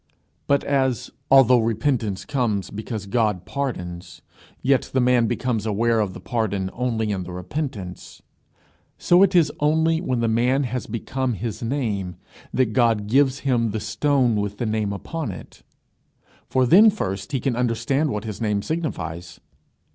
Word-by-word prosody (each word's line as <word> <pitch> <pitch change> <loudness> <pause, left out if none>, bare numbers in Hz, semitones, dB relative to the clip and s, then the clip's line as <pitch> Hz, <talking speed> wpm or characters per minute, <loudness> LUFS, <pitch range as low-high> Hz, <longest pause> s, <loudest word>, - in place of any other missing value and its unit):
But 140 0 +2
as 130 -3 0 0.2
although 130 -2 +6
repentance 115 -2 -1
comes 120 -9 -1
because 110 0 -5
God 105 -4 0
pardons 90 -11 -5 0.4
yet 135 0 +2
the - - +4
man 125 -2 +3
becomes 115 -2 -1
aware 115 +2 +1
of 100 -4 -1
the - - -7
pardon 100 -5 -2
only 115 -3 -1
in 95 -2 -2
the 90 0 -7
repentance; 95 - -6 0.8
so 175 +1 +4
it 195 -1 +4
is 160 -4 +4
only 160 +2 +2
when 130 -9 -1
the 115 - +1
man 125 +5 +2
has 125 -1 -3
become 125 +3 -2
his 115 +1 -5
name 110 -8 -2 0.4
that 125 -4 +1
God 115 -3 +2
gives 135 +4 +2
him 120 -4 +1
the 110 +1 -3
stone 130 +2 +1
with 105 0 -2
the 120 - -2
name 110 -2 -1
upon 145 +6 -4
it, 90 - -11 0.9
for 130 -1 +2
then 200 - +7
first 100 - -3
can 130 +1 -1
he 120 - -3
understand 125 +5 0
what 105 -4 -3
his 110 -1 -6
name 105 -2 0
signifies. 90 - -4
115 Hz, 155 wpm, -23 LUFS, 105-135 Hz, 0.9 s, then